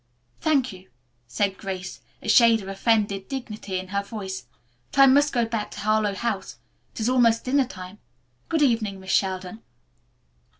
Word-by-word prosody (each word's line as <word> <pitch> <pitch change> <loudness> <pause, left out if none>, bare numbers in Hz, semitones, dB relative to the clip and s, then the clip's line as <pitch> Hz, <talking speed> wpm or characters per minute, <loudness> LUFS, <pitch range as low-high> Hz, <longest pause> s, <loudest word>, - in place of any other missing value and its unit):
"Thank 275 -7 +1
you," 185 0 -14 0.4
said 195 - -1
Grace, 190 -2 -6 0.2
a - - -7
shade 225 -1 +5
of - - -9
offended 200 -1 0
dignity 215 -7 -5
in 185 0 -6
her 200 0 0
voice, 195 - -6 0.4
"but - - -2
I - - +10
must 285 +2 +5
go 240 -2 +1
back 225 -2 -3
to - - -8
Harlowe 215 -1 +1
House. 195 - -3 0.4
It - - -5
is 220 - +1
almost 235 -3 +3
dinner 265 0 +2
time. 185 -2 -10 0.5
Good 320 -2 +2
evening, 220 -7 +1
Miss 190 0 -6
Sheldon." 190 +2 -1
215 Hz, 165 wpm, -25 LUFS, 190-235 Hz, 0.5 s, I